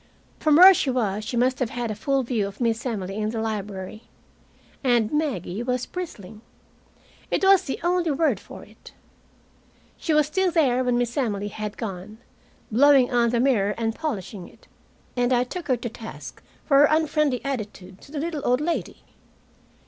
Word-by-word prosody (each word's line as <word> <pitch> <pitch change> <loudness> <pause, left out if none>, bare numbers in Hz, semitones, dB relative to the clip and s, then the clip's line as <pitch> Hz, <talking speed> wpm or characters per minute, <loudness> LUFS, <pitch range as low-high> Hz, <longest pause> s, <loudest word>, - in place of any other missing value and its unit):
From 305 -1 +3
where 370 +4 +10
she 300 - 0
was 215 -5 -1
she 240 +3 -4
must 255 +2 +1
have 250 -4 0
had 240 -1 -3
a - - -1
full 270 +6 0
view 230 -5 -1
of 200 0 -11
Miss 230 0 0
Emily 195 -4 -4
in 215 0 -1
the 225 0 -3
library. 210 -1 -5 0.8
And 240 -3 +2
Maggie 235 - -2
was 250 0 -1
bristling. 220 - -8 0.9
It - - -1
was 385 -1 +5
the 270 - -4
only 350 -1 +1
word 305 +2 +1
for - - -12
it. - - -16 1.0
She 325 - -3
was 300 -1 +4
still 370 +5 0
there 270 -7 +2
when 250 -1 +1
Miss 240 -1 -1
Emily 205 -6 -1
had 210 0 -6
gone, 210 -1 -6 0.5
blowing 270 +2 +5
on 240 -1 +3
the 240 0 0
mirror 220 -6 +2
and 225 -1 -1
polishing 210 - -5
it. - - -22 0.5
And 245 0 +1
I 245 -1 +3
took 345 +8 -7
her 255 -3 +2
to 235 +1 -5
task 225 0 -10 0.2
for 275 -2 +4
her 290 - +8
unfriendly 305 -3 +1
attitude 205 -8 -6
to - - -16
the 305 - -6
little 315 -1 -3
old 250 +1 +2
lady. 335 +3 -3
245 Hz, 180 wpm, -24 LUFS, 215-290 Hz, 1.0 s, where